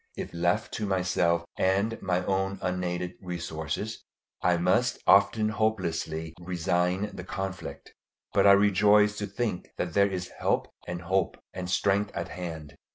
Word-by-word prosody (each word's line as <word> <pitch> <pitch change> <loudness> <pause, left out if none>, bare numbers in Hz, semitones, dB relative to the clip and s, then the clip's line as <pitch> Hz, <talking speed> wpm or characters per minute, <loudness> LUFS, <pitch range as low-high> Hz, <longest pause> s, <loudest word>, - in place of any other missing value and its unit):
If - - -5
left 90 +6 0
to 105 - -2
myself 90 -3 +1
and 100 +4 +1
my 90 -1 0
own 95 0 0
unaided 90 0 -2
resources, 90 +4 -4 0.4
I 90 -1 +3
must 95 +9 +2
often 100 +2 +5
hopelessly 85 -7 -1
resign 90 +3 0
the 90 - -7
conflict. 95 0 -6 0.4
But - - +5
I 100 - +9
rejoice 105 +1 +5
to 105 - -2
think 105 -2 -3
that - - -2
there 100 0 +4
is 90 -1 -4
help - - +1 0.2
and 90 0 -5
hope 95 -2 0 0.2
and 90 -1 -5
strength 100 +2 +2
at - - -3
hand. 80 -5 -6
95 Hz, 145 wpm, -28 LUFS, 90-100 Hz, 0.4 s, I